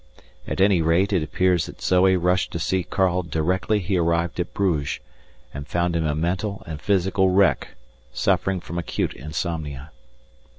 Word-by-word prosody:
At - - -3
any 95 -3 +4
rate 85 +5 +2
it 90 - +2
appears 90 +1 +1
that - - -11
Zoe 95 +1 +3
rushed 90 +1 +1
to - - -2
see 95 +3 0
Karl 90 +1 +1
directly 90 +5 0
he 95 -1 -1
arrived 85 +1 0
at 90 - -2
Bruges, 85 -8 -1 0.5
and 70 +1 -7
found 85 0 0
him 80 -1 0
a 75 - 0
mental 95 +5 -2
and 80 -2 -7
physical 95 -1 +2
wreck, 95 0 +3 0.4
suffering 95 +7 0
from 85 +1 -5
acute 85 - -2
insomnia. 75 -1 -5
90 Hz, 160 wpm, -23 LUFS, 80-95 Hz, 0.5 s, any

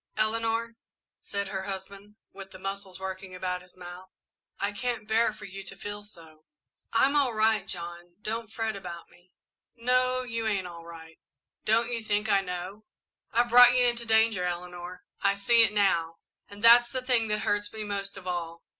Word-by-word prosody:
"Eleanor," 225 +1 0 0.5
said 200 -1 -3
her 190 -1 -3
husband, 200 +1 -8 0.2
with 195 0 -10
the 190 - -11
muscles 195 -1 -6
working 190 0 -6
about 180 0 -3
his 180 0 -20
mouth, 180 +1 -10 0.5
"I 200 +1 0
can't 230 +1 -3
bear 220 +1 +3
for 210 -1 -11
you 195 0 -8
to 195 - -9
feel 205 +1 -6
so." 160 -6 -16 0.5
"I - - +4
I'm 280 +2 +1
all 270 -6 +2
right, 215 -2 +2
John. 175 -1 -6
Don't 220 +1 -4
fret 225 -1 -2
about 175 -3 -8
me." 175 +1 -23 0.5
"No, 255 +1 +1
you 230 -2 -3
ain't 200 -4 0
all 170 -1 -9
right 160 -1 -12 0.5
don't 230 +2 +2
you 230 -2 -3
think 210 0 0
I 200 -1 +4
know? 185 +3 -6 0.5
I've 240 +1 +2
brought 245 +1 +8
you 250 - +5
into 235 -1 0
danger, 220 -3 +4
Eleanor 180 0 -5 0.2
I 200 0 +3
see 230 +4 +5
it 225 - +4
now, 175 -6 +2 0.3
and 205 +1 -12
that's 240 +1 +8
the 255 0 -2
thing 245 -3 +3
that 210 0 0
hurts 205 0 0
me 220 -1 -6
most 200 -1 -4
of 190 - -10
all. 170 -2 -4
205 Hz, 185 wpm, -28 LUFS, 185-225 Hz, 0.5 s, brought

